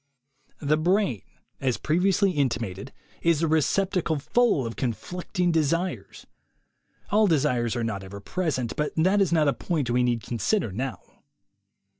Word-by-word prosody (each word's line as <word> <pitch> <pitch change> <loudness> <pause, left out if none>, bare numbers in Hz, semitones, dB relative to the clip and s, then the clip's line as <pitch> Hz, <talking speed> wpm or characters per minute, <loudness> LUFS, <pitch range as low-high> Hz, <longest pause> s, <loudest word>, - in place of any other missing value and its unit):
The 150 +1 +1
brain, 170 - +1 0.4
as 130 -3 0
previously 190 +5 +2
intimated, 120 - -2 0.3
is 165 -1 +2
a - - +3
receptacle 165 +2 +1
full 155 - +2
of 115 - -5
conflicting 175 +8 -2
desires. 165 +3 -1 0.9
(All 210 +1 +4
desires 125 - +1
are 120 - -1
not 105 -4 -3
ever 100 +1 -8
present, 130 - -2
but 150 0 -2
that 190 +5 +3
is 190 - +2
not 155 -3 +3
a 140 - +3
point 150 -9 -2
we 125 +1 +2
need 120 -2 0
con 120 - -5
sider 195 - +1
now.) 125 +5 -4
150 Hz, 145 wpm, -26 LUFS, 120-180 Hz, 0.9 s, All